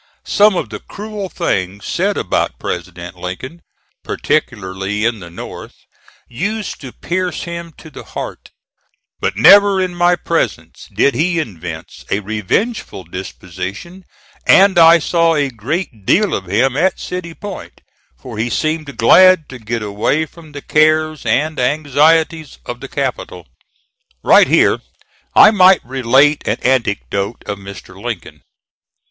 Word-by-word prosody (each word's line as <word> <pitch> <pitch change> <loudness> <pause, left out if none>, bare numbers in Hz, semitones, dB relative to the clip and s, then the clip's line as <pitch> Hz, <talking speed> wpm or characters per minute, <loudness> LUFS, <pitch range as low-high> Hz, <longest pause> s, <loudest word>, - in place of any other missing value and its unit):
Some 210 -1 +4
of 115 - -2
the 105 - -6
cruel 210 -2 -7
things 100 - -2
said - - -1
about - - -1
President 90 0 -6
Lincoln, 130 - -7 0.4
particularly 95 +3 -2
in 115 -2 0
the 85 -2 -10
North, 85 - -9 0.5
used 200 - -4
to 130 -3 -8
pierce 180 +5 -3
him 170 -1 -7
to 160 - -13
the - - -10
heart; - - -8 0.7
but - - -2
never 200 -1 +7
in 185 -1 -1
my 175 0 +3
presence - - -3
did 140 - +2
he 170 +7 0
evince 85 - -6
a 100 - 0
revengeful 110 - -2
disposition 95 - -8 0.4
and 195 -2 +6
I 165 0 +8
saw 165 0 +1
a 145 -2 0
great 120 - -4
deal 200 - +2
of 95 - -3
him 120 +8 +1
at 180 +6 +1
City 175 -2 -6
Point, 205 -2 -9 0.4
for 110 - -9
he 115 +2 -1
seemed 155 +1 -2
glad 185 +7 +6
to 130 - -9
get 115 0 -4
away 105 +10 0
from 160 -1 -16
the 145 - -8
cares 155 -2 +2
and 155 +8 0
anxieties 155 +3 +1
of - - -6
the - - -9
capital. - - -4 0.8
Right - - +6
here - - +3 0.5
I 215 - +8
might 190 -3 +5
relate 135 +3 +2
an - - 0
anecdote 105 -4 -1
of 100 -1 -5
Mr. 100 0 -11
Lincoln. - - -6
145 Hz, 140 wpm, -16 LUFS, 105-175 Hz, 0.8 s, I